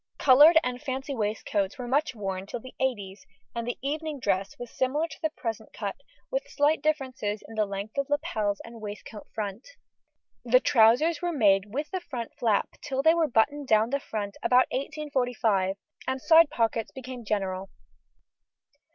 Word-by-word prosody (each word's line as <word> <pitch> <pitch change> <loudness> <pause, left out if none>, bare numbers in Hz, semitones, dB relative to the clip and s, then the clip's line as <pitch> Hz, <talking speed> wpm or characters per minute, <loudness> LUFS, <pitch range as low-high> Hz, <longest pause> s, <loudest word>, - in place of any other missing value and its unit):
Coloured 295 +5 +7
and 250 0 -3
fancy 270 0 -4
waistcoats 210 -3 -1
were 250 -2 -5
much 285 +2 +1
worn 195 -2 -4
till 245 - -5
the 255 +2 -12
eighties, 205 -7 -2 0.3
and 235 0 -2
evening 305 +1 -3
dress 195 -4 -1
was 245 -1 -8
similar 290 +5 0
to - - -11
the 315 - +1
present 225 -7 -6
cut, 200 -3 -4 0.4
with - - -2
slight 295 +2 +2
differences 260 -9 -1
in - - -11
the 215 -1 0
length 200 +6 -5
of 275 - -2
lapels 225 -10 -1
and 230 -1 -11
waistcoat 210 0 -8
front. 210 +1 -4 0.8
The 250 +1 +5
trousers 250 +9 +4
were 350 0 0
made 200 - +3
with 290 +6 -3
the 375 -1 -2
front 250 -8 -6
flap 220 -4 +2
till 270 -2 -2
they 320 - +6
were 335 -2 +2
buttoned 285 +4 +1
down 220 +1 +3
the 280 - +1
front 205 -6 -5
about 250 +1 +5
1845, 245 -9 0 0.3
and 260 0 -1
side 325 +2 +6
pockets 225 -1 0
became 255 -2 -8
general. 195 -3 -2
245 Hz, 165 wpm, -27 LUFS, 210-285 Hz, 0.8 s, Coloured